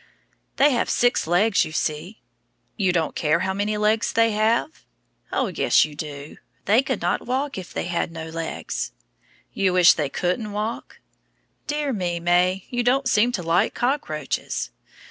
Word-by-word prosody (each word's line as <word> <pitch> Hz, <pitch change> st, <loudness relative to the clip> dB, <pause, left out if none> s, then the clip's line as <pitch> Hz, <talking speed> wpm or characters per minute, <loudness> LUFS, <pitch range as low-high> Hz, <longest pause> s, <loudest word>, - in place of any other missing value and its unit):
They 290 Hz, +2 st, +4 dB
have 240 Hz, -, 0 dB
six 245 Hz, -8 st, +2 dB
legs, 195 Hz, +5 st, +3 dB
you -, -, -6 dB
see. 155 Hz, +7 st, -3 dB, 0.5 s
You 190 Hz, -5 st, +1 dB
don't 165 Hz, -3 st, -1 dB
care 160 Hz, +2 st, +1 dB
how 190 Hz, 0 st, -1 dB
many 205 Hz, +2 st, -1 dB
legs 215 Hz, +2 st, +1 dB
they 230 Hz, 0 st, +3 dB
have? 220 Hz, +8 st, 0 dB, 0.5 s
Oh, -, -, +1 dB
yes, -, -, +4 dB
you 155 Hz, -, -10 dB
do. 145 Hz, -1 st, -8 dB, 0.3 s
They 215 Hz, +6 st, +4 dB
could 260 Hz, -8 st, -3 dB
not 175 Hz, -, -1 dB
walk 270 Hz, +3 st, -1 dB
if 185 Hz, -2 st, -7 dB
they -, -, -3 dB
had 175 Hz, -1 st, -2 dB
no 165 Hz, -1 st, -7 dB
legs. 165 Hz, 0 st, -4 dB, 0.6 s
You 190 Hz, -2 st, +1 dB
wish 180 Hz, -1 st, +7 dB
they 150 Hz, -3 st, -2 dB
couldn't 200 Hz, -, -2 dB
walk? 215 Hz, +2 st, -5 dB, 0.7 s
Dear 295 Hz, -2 st, -1 dB
me, 175 Hz, -5 st, -2 dB
May; 180 Hz, +2 st, +2 dB
you 245 Hz, -1 st, 0 dB
don't 255 Hz, +2 st, +2 dB
seem 240 Hz, -1 st, +3 dB
to 180 Hz, -, -2 dB
like 165 Hz, +2 st, +1 dB
cockroaches. 240 Hz, -, -2 dB
195 Hz, 165 wpm, -23 LUFS, 170-235 Hz, 0.7 s, wish